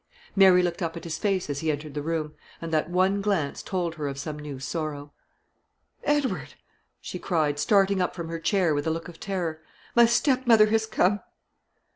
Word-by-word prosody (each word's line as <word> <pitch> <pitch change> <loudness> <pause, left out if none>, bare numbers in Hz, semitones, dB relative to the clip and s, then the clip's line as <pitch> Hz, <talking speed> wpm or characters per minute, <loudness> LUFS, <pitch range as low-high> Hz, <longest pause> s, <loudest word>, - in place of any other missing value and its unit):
Mary 190 -2 +6
looked 175 0 -2
up 165 -1 -2
at - - -8
his 160 -2 -4
face 195 -3 0
as 145 -1 -3
he 160 - -1
entered 150 0 -5
the 150 - -3
room, 155 -1 -2 0.3
and 165 -1 -6
that 155 +1 +1
one 190 +3 +2
glance 195 -9 -1
told 175 -3 -2
her 155 -3 -4
of 140 -1 -5
some 150 +1 -5
new 145 -2 -7
sorrow. 145 +1 -4 0.9
"Edward," 290 -3 0 0.4
she 180 - -7
cried, 155 -6 0
starting 195 +2 +3
up 180 - -1
from 170 -2 -5
her 165 0 -4
chair 180 -2 +2
with 145 +1 -1
a - - +2
look 165 +1 -4
of 170 -2 -12
terror, 175 -5 -3 0.3
"my 235 -1 +7
stepmother 235 -2 +4
has 220 +1 +1
come." 205 -2 +2
170 Hz, 190 wpm, -26 LUFS, 155-195 Hz, 0.9 s, my